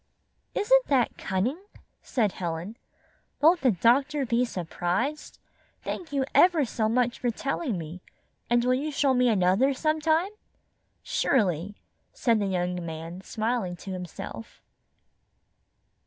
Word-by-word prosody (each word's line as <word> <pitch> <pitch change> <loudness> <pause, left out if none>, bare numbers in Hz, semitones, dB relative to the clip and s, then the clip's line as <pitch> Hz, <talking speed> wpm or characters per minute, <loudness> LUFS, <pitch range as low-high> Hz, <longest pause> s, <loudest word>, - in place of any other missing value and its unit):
"Isn't - - +4
that 260 -4 +2
cunning?" 220 - -1 0.4
said 220 -7 0
Helen. 175 +4 -5 0.6
"Won't 335 +4 +5
the 260 - +4
doctor 270 - +2
be 235 +1 +2
surprised? 180 - -3 0.5
Thank 340 -4 -5
you 275 -2 0
ever 345 -5 +5
so 220 -2 -1
much 240 +1 +1
for 245 - 0
telling 275 - -2
me, 165 +2 -7 0.5
and 240 0 +3
will 250 - +3
you 290 +4 -1
show 275 -1 +2
me 250 -1 +3
another 210 +7 +3
sometime?" 315 +5 +1 0.7
"Surely," 200 - 0 0.4
said 230 -3 +2
the 200 - 0
young 180 -1 -1
man, 165 +2 -7
smiling 220 -2 -2
to 190 +3 -9
himself. 180 -10 -7
235 Hz, 125 wpm, -27 LUFS, 185-280 Hz, 0.7 s, Won't